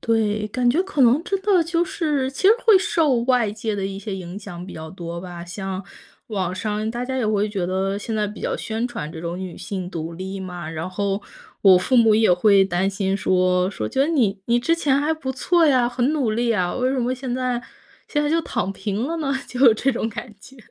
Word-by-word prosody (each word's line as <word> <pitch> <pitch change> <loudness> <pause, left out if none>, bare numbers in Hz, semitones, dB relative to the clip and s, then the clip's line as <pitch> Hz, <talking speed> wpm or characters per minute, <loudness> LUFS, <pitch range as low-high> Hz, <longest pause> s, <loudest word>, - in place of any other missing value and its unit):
对， 215 -2 0
感 245 +3 0
觉 335 +8 +2
可 380 -7 -3
能 255 +6 +5
真 390 -1 -1
的 385 -4 +4
就 335 +1 +1
是， 295 -6 -1
其 270 - -8
实 390 - +7 0.2
会 440 -3 +8
受 315 -7 +2
外 245 -4 +2
界 215 0 -3
的 195 -1 -2
一 195 0 -6
些 200 0 -5
影 185 0 -7
响 180 -4 -8
比 - - -9
较 160 0 -8
多 170 -1 -6
吧。 175 -2 -8
像 190 +2 -5 0.5
网 185 -5 -2
上 215 +2 -2
大 240 +2 -4
家 260 +1 -3
也 250 -4 0
会 210 0 +1
觉 195 -4 -2
得 190 +2 -1
现 225 +2 -4
在 210 -1 +1
比 210 +1 -8
较 - - -1
宣 225 +2 -3
传 230 -11 -6
这 160 - -9
种 170 +1 -4
女 185 -2 -6
性 185 -3 -5
独 165 -2 -5
立 190 +3 -6
嘛， 180 -3 -6
然 160 +2 -4
后 200 +1 -2 0.4
我 190 -2 +8
父 250 +8 +1
母 225 -2 +6
也 220 -1 +4
会 195 +2 +5
担 190 0 0
心 195 -1 -1
说 185 -1 +2
说： 110 - -4
“觉 - - -5
得 275 - +4
你 230 -11 +1
你 240 0 +2
之 330 +6 +2
前 280 -5 +1
还 305 +2 +1
不 265 -4 -4
错 340 +5 +3
呀， 255 -4 +4
很 245 0 0
努 270 -8 0
力 235 +1 +1
啊， 180 -5 0
为 255 0 0
什 270 - -1
么 245 +1 0
现 255 -1 -4
在 250 -1 -1 0.4
现 295 -1 0
在 295 - 0
就 330 +2 +2
躺 195 - -2
平 200 +4 -3
了 330 +3 -3
呢？ 290 -4 -1 0.2
“就 250 - -6
有 245 -5 +8
这 260 +5 +1
种 235 -3 -2
感 215 +1 -7
觉。 265 +6 -16
215 Hz, 260 characters per minute, -22 LUFS, 190-260 Hz, 0.5 s, 会